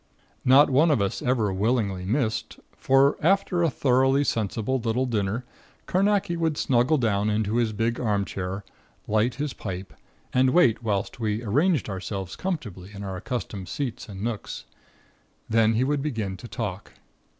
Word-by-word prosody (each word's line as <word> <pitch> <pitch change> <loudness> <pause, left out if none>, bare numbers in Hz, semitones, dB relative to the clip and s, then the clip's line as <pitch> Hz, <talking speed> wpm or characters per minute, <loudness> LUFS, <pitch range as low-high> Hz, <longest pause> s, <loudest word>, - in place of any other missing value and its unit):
Not 135 +3 +6
one 150 +6 +4
of 145 -6 +3
us 100 -1 -1
ever 115 -6 +1
willingly 100 -2 0
missed, 110 +1 -1 0.2
for 135 +2 +3
after 185 0 +2
a 165 - +3
thoroughly 135 +1 +3
sensible 115 +1 -1
little 120 +2 0
dinner 115 0 -1 0.4
Carnacki 195 -1 +1
would 165 -3 0
snuggle 130 +5 +2
down 105 -4 +1
into 105 +1 0
his 115 -2 +1
big 115 +2 -1
armchair, 100 -3 -2 0.4
light 110 +3 +1
his 145 -2 -3
pipe, 95 -2 -6 0.4
and 130 +1 +4
wait 125 -12 +4
whilst 105 -1 -2
we 110 0 -1
arranged 145 - +2
ourselves 95 -1 -5
comfortably 110 - -4
in 100 - -7
our 95 -1 -4
accustomed 105 -2 -5
seats 125 -4 -4
and 100 0 -7
nooks. 110 - -4 0.8
Then 115 0 +3
he 115 +3 +2
would 145 +1 0
begin 110 -10 -3
to 120 - -10
talk. 105 -3 -5
115 Hz, 150 wpm, -25 LUFS, 100-135 Hz, 0.8 s, Not